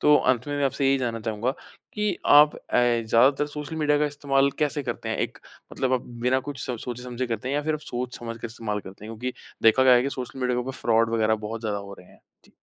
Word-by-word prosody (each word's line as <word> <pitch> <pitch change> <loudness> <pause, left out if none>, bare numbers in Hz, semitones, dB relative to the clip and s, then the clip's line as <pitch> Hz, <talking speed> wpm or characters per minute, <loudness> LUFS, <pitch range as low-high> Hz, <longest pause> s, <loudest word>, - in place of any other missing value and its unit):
तो 150 - +6
अंत 125 0 +1
में 145 - -2
मैं 145 - +1
आपसे 135 0 0
यही 135 0 +3
जानना 115 -3 -2
चाहूँगा 110 +2 -1 0.4
कि 210 -1 0 0.2
आप 150 +1 +7
अ, - - -9 0.2
ज़्यादातर 120 +4 +3
सोशल 150 +2 -6
मीडिया 150 -1 +2
का 150 - +2
इस्तेमाल 140 -1 +1
कैसे 145 -1 0
करते - - -4
हैं? - - -1
एक - - -3 0.3
मतलब 130 -1 -1
आप 125 - +1 0.2
बिना 130 +1 +3
कुछ 140 -2 -5
सो 125 - -3
सोचे-समझे 125 +1 -5
करते 115 +2 -3
हैं 140 - -1
या 145 - 0
फिर 155 +1 0
आप 155 - -5
सोच-समझ 120 -3 -5
के - - -3
इस्तेमाल 110 -2 -4
करते 95 +2 -12
हैं 110 +1 -7
क्योंकि 125 +3 -3 0.3
देखा 115 +4 +6
गया 130 -1 +8
है 120 - +4
कि 140 - -1
सोशल 130 +1 -6
मीडिया 125 -1 +1
के - - +1
ऊपर 130 - -5
फ्रॉड 115 0 +3
वगैरह 110 -1 +3
बहुत 115 +1 -5
ज़्यादा 105 -3 -2
हो 100 0 -9
रहे 90 - -15
हैं? - - -21 0.2
जी। - - -23
125 Hz, 250 wpm, -25 LUFS, 115-140 Hz, 0.4 s, गया